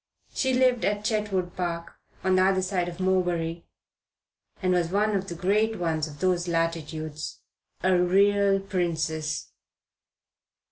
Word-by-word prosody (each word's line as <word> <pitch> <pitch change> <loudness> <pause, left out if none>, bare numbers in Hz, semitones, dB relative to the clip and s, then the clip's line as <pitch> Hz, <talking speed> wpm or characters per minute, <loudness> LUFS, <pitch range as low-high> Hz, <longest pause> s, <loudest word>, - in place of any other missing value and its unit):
She 260 -1 +1
lived 250 -3 +3
at 205 +2 0
Chetwood 205 -5 -1
Park, 170 -2 -3 0.3
on 190 -1 +3
the 185 - +4
other 190 0 +3
side 185 -2 -1
of 170 +1 -10
Morebury, 175 -3 0 0.9
and 185 -1 +1
was 175 -2 +1
one 210 +3 +1
of 195 0 -1
the 170 - -5
great 210 +5 +1
ones 160 -3 -1
of 145 -1 -12
those 180 -1 +1
latitudes. 160 -2 -3 0.4
A 185 0 +4
real 195 +2 +4
princess. 160 -5 -2
185 Hz, 135 wpm, -26 LUFS, 170-195 Hz, 0.9 s, the